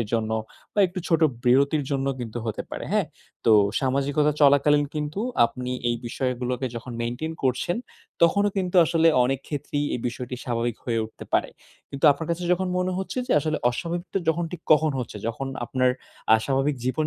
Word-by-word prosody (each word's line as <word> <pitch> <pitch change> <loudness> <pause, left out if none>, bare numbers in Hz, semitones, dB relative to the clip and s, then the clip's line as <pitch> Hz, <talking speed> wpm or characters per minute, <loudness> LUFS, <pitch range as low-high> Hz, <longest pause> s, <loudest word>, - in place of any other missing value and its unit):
এর 115 - -1
জন্য 110 -1 0 0.4
বা 205 - +3
একটু 180 +1 -7
ছোট 165 -1 +3 0.2
বিরতির 140 +4 +3
জন্য 135 -1 0
কিন্তু 120 -1 -5
হতে 110 - -3
পারে, - - -5
হ্যাঁ। - - +2 0.4
তো 115 - +5 0.3
সামাজিকতা 140 +3 +1
চলাকালীন 145 +1 +5
কিন্তু 150 +5 -3 0.3
আপনি 125 +2 -6 0.2
এই 120 - +1
বিষয়গুলোকে 125 0 -2
যখন 120 +2 -7
মেইনটেইন 120 +7 -3
করছেন, 130 +7 0 0.5
তখনও 200 +5 +4
কিন্তু 185 -1 0
আসলে 165 0 +3 0.2
অনেক 135 +1 0
ক্ষেত্রেই 145 0 -2
এই - - -3
বিষয়টি 125 +2 -6
স্বাভাবিক 120 -2 -1
হয়ে 115 -2 0
উঠতে 110 - -10
পারে। - - +2 0.4
কিন্তু 140 +2 -5
আপনার 160 +3 -7
কাছে 170 +1 -2
যখন 185 +1 0
মনে 180 0 0
হচ্ছে 190 +6 -4
যে - - +1
আসলে 155 +1 -1
অস্বাভাবিকটা 170 +9 -3
যখন 170 +2 +2
ঠিক 175 - -6
কখন 155 0 +4
হচ্ছে, 120 -3 -5
যখন 125 +4 -4 0.2
আপনার 130 +1 +2 0.5
আস্বাভাবিক 135 +4 0
জীবন 150 +4 0
140 Hz, 170 wpm, -25 LUFS, 125-160 Hz, 0.5 s, তো